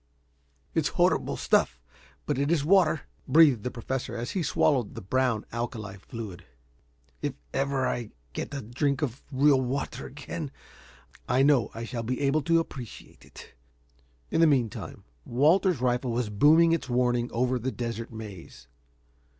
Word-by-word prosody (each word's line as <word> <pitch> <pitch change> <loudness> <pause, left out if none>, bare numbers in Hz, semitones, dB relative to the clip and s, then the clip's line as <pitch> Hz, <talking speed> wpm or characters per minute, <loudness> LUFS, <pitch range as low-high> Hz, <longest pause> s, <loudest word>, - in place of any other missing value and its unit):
"It's - - +1
horrible - - +2
stuff, - - +2 0.5
but - - -1
it 140 +1 +1
is 155 -4 +2
water," 170 -4 +4 0.3
breathed 150 -8 +6
the 125 - -3
Professor 125 0 -4
as 120 +1 -4
he 190 - -1
swallowed 135 -6 +1
the - - -6
brown 125 +2 0
alkali 110 -4 -5
fluid. 100 -2 -8 0.8
"If 145 -3 -2 0.2
ever 135 -1 0
I 120 -3 -3 0.2
get - - -4
a 140 -3 -5
drink 140 +6 -1
of 130 -2 -3
real 135 0 +4
water 130 +2 -3
again, - - -6 0.8
I 130 - +4
know 140 -5 +4
I 115 - -5
shall 115 0 -4
be 125 +3 -3
able 140 +2 +2
to 165 +2 +3
appreciate 130 -8 -8
it." - - -14 0.8
In - - +2
the 165 - +7
meantime 125 -8 -1 0.2
Walter's 155 - +3
rifle 125 0 +1
was 115 -2 -1
booming 155 +10 +5
its 165 -5 -1
warning 120 -1 +1
over 125 +1 0
the 130 +3 -2
desert 115 0 -5
maze. 100 - -10
125 Hz, 150 wpm, -27 LUFS, 115-145 Hz, 0.8 s, the